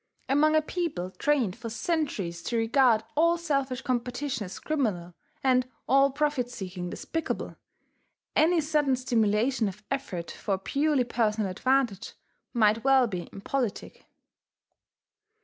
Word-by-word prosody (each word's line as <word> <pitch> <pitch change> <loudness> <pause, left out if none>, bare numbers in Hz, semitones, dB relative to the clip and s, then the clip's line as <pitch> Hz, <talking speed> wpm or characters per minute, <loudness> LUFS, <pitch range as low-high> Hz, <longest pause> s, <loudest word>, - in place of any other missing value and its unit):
Among 305 +3 +3
a 310 - +4
people 305 - -3
trained 255 -7 +1
for 235 -1 -7
centuries 225 - -2
to 235 - -1
regard 230 -1 +3
all 335 +3 +4
selfish 275 -6 -1
competition 245 -1 -2
as 185 - -8
criminal, 210 - -2 0.3
and 255 -1 +3 0.2
all 275 +2 +5
profit 280 -3 0
seeking 185 -6 -6
despicable, 325 - -4 0.8
any 325 +2 +4
sudden 295 -3 +2
stimulation 230 -1 +1
of 200 +2 -7
effort 230 -12 -3
for 195 -3 -2
purely 280 +7 +1
personal 220 -4 0
advantage 255 -1 0 0.4
might 220 -2 +3
well 270 -1 +5
be 180 -6 -5
impolitic. 235 +2 -4
250 Hz, 120 wpm, -28 LUFS, 210-285 Hz, 0.8 s, all